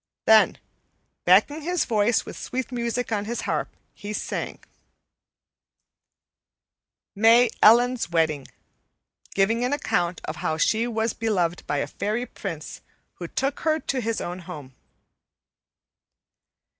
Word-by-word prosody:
Then, 220 -1 +5 0.7
backing 295 +2 +4
his 355 +2 0
voice 220 0 +2
with - - -8
sweet 260 0 -4
music 240 0 -2
on 205 -2 -1
his 235 +2 -3
harp, - - -2 0.2
he 205 +1 -7
sang: - - -4 2.6
MAY 225 +3 +5
ELLEN'S 240 0 +5
WEDDING 160 -4 0 0.9
(Giving 225 +5 +2
an 250 +3 0
account 175 - -1
of 155 - -5
how 155 - -2
she 220 +8 +2
was 225 -1 -1
beloved 180 -7 -1
by 145 - 0
a - - 0
fairy 220 +4 -3
prince, 165 -10 -7 0.4
who 175 - -5
took 270 +9 -2
her 315 0 +1
to 265 -4 -2
his 230 0 -2
own 175 +1 -5
home.) 150 -7 -9
220 Hz, 120 wpm, -24 LUFS, 180-245 Hz, 2.6 s, Then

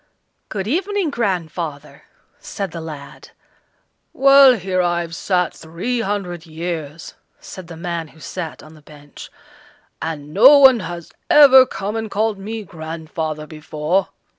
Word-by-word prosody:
"Good 195 -3 -4
evening, 370 - -1
grandfather!" 170 - -4 0.3
said 195 -4 -6
the 165 - -7
lad. 150 -3 -10 0.8
"Well, 275 -1 +7
here 185 -3 -1
I've 175 -1 -1
sat 180 +1 -1
three 170 +10 -4
hundred 180 -5 -4
years," 160 -1 -6 0.3
said 185 -3 -10
the 165 -1 -10
man 170 -1 -4
who 160 - -20
sat 165 0 -7
on 155 - -14
the 155 - -17
bench, 145 -1 -13 0.7
"and 150 -2 -6
no 260 +9 +8
one 265 -4 +7
has 175 -3 -7 0.2
ever 265 -3 +8
come 200 +3 -5
and 220 -1 -3
called 210 0 -1
me 215 +2 -6
grandfather 160 -2 -6
before." 155 +3 -2
175 Hz, 135 wpm, -19 LUFS, 160-215 Hz, 0.8 s, no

